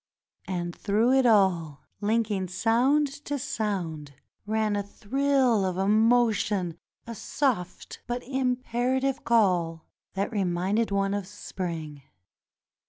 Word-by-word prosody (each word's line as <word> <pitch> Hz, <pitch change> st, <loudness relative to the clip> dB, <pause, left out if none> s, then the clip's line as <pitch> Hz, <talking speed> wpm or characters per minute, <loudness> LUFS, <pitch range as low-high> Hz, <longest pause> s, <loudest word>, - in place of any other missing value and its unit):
And 175 Hz, -2 st, -3 dB
through 220 Hz, +4 st, +1 dB
it 265 Hz, -1 st, +4 dB
all, 180 Hz, -9 st, +2 dB, 0.2 s
Unking 210 Hz, -3 st, 0 dB
sound 240 Hz, +10 st, +2 dB, 0.2 s
to 290 Hz, -, -2 dB
sound, 170 Hz, -, -3 dB, 0.3 s
ran 215 Hz, -1 st, 0 dB
a 205 Hz, -, 0 dB
thrill 255 Hz, +2 st, +1 dB
of 185 Hz, -1 st, -1 dB
emotion, 210 Hz, -3 st, +2 dB, 0.3 s
a 235 Hz, -, -6 dB
soft 225 Hz, -5 st, -2 dB
but 245 Hz, +1 st, -3 dB
imperative 255 Hz, 0 st, -1 dB
call 180 Hz, -8 st, +2 dB, 0.3 s
that 200 Hz, +4 st, -1 dB
reminded 195 Hz, +2 st, 0 dB
one 195 Hz, 0 st, 0 dB
of 200 Hz, -2 st, -3 dB
spring. 165 Hz, -7 st, -6 dB
210 Hz, 105 wpm, -27 LUFS, 185-240 Hz, 0.3 s, it